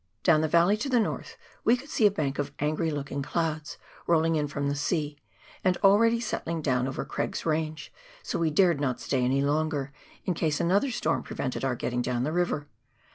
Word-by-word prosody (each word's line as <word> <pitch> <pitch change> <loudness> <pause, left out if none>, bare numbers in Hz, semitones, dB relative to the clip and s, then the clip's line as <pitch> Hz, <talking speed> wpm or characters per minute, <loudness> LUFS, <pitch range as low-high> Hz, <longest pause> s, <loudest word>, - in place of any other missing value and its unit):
Down 160 -4 +5
the 160 - +1
valley 170 +6 +4
to 250 +6 -3
the 250 -2 +4
north, 220 - -3 0.3
we 240 - +4
could 280 +4 -12
see 215 - +5
a - - +4
bank 145 -8 -2
of 145 0 -2
angry 155 +2 0
looking 140 -2 -3
clouds, 155 0 -2 0.3
rolling 165 -1 +3
in 150 -1 0
from 140 0 -2
the 140 - 0
sea, 150 0 -2 0.4
and 185 -1 +2
already 230 +4 +5
settling 170 -8 -3
down 130 -2 +1
over 135 - -4
Craig's - - -3
Range, 155 -1 -2 0.3
so - - -2
we 165 -1 +2
dared 170 -1 +3
not 130 -4 0
stay 130 -2 0
any 135 +2 +2
longer, 145 -1 0 0.3
in 180 - +1
case 155 -3 0
another 200 +10 +2
storm 165 -9 0
prevented 130 -1 -4
our 130 -2 +1
getting 125 +1 -2
down 125 0 -1
the 150 - -1
river. 175 -4 0
155 Hz, 200 wpm, -28 LUFS, 140-175 Hz, 0.4 s, Down